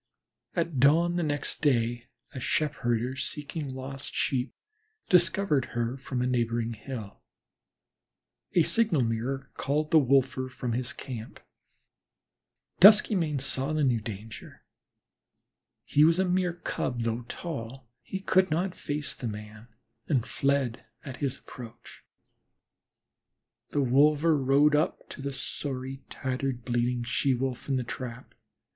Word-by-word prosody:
At 165 -5 -1
dawn 165 +6 +4
the - - +1
next 145 -2 -2
day 120 -4 +1 0.3
a 130 - -5
sheepherder 125 -3 0
seeking 150 +1 -3
lost 135 +1 -7
Sheep 130 -1 0 0.5
discovered 180 -5 +3
her 120 +1 -1
from 130 -2 -3
a - - +1
neighboring 115 -2 0
hill. 110 -3 -8 1.3
A 170 - +5
signal 210 - +3
mirror 125 +4 -2
called 150 +2 -1
the 160 - +7
wolver 130 -1 +2
from 125 -1 -4
his 125 +1 -2
camp. 120 -5 -8 1.4
Duskymane 190 -7 +6
saw 135 +2 -1
the 155 -1 +1
new 120 -5 +2
danger. 110 +1 -9 1.2
He 150 - +3
was 165 +2 +5
a 190 - +2
mere 180 -1 +1
Cub, 130 -7 -3
though 115 0 -1
so - - -15
tall; 130 -6 -6
he 190 - -5
could 190 -1 +3
not 175 +4 0
face 150 -3 -4
the 125 - -5
man, 105 +1 -8 0.4
and 130 -6 +1
fled 135 -4 0 0.2
at 130 -3 -7
his 140 -2 -2
approach. 120 -3 -12 1.7
The 145 - 0
wolver 150 +5 +4
rode 140 +2 +4
up 150 - 0
to - - -8
the 140 +1 -3
sorry, 135 -1 -4
tattered, 130 -2 -3
bleeding 120 0 0
She 130 +2 +1
wolf 130 +1 -3
in 135 - +2
the 130 - 0
trap. 125 0 -7
135 Hz, 130 wpm, -28 LUFS, 120-150 Hz, 1.7 s, the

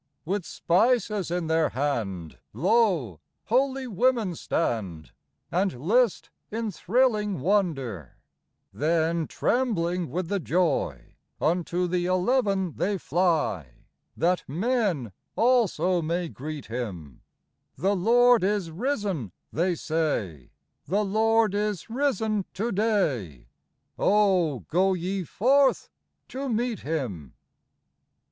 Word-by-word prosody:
With 185 +1 -2
spices 210 0 +1
in 175 0 -1
their 160 0 +2
hand, 110 - -3
Lo! 165 - +1 0.3
holy 265 +2 +1
women 235 -3 +1
stand, 100 - -2 0.4
And 180 -6 0
list 220 - +1 0.2
in 225 0 -3
thrilling 210 -1 +1
wonder: 135 - -1 0.6
Then, 160 +1 +1
trembling 180 - 0
with 175 +5 -3
the 200 +2 -1
joy, 160 - -1 0.2
Unto 175 +1 0
the 175 0 0
eleven 190 - +1
they 200 +1 0
fly, 155 - 0 0.4
That 180 +2 +1
tnen 185 - 0 0.2
also 220 -7 +2
may 170 +2 -2
greet 150 0 -7
Him: 95 - -6 0.3
" - - -51
The 195 +3 +1
Lord 240 +3 +4
is 195 -4 0
risen," 195 - -2 0.2
they 175 +3 +1
say, 145 - -2 0.2
" - - -51
The 205 +3 +1
Lord 220 +1 +2
is 205 -1 -2
risen 220 -6 0
to 230 +4 -1
day: 150 - -1 0.5
Oh, 185 - +3
go 190 +3 +1
ye 185 +2 -2
forth 270 - +2 0.4
to 270 +1 -4
meet 235 -1 -1
Him 120 - -4
180 Hz, 110 wpm, -26 LUFS, 155-215 Hz, 0.6 s, Lord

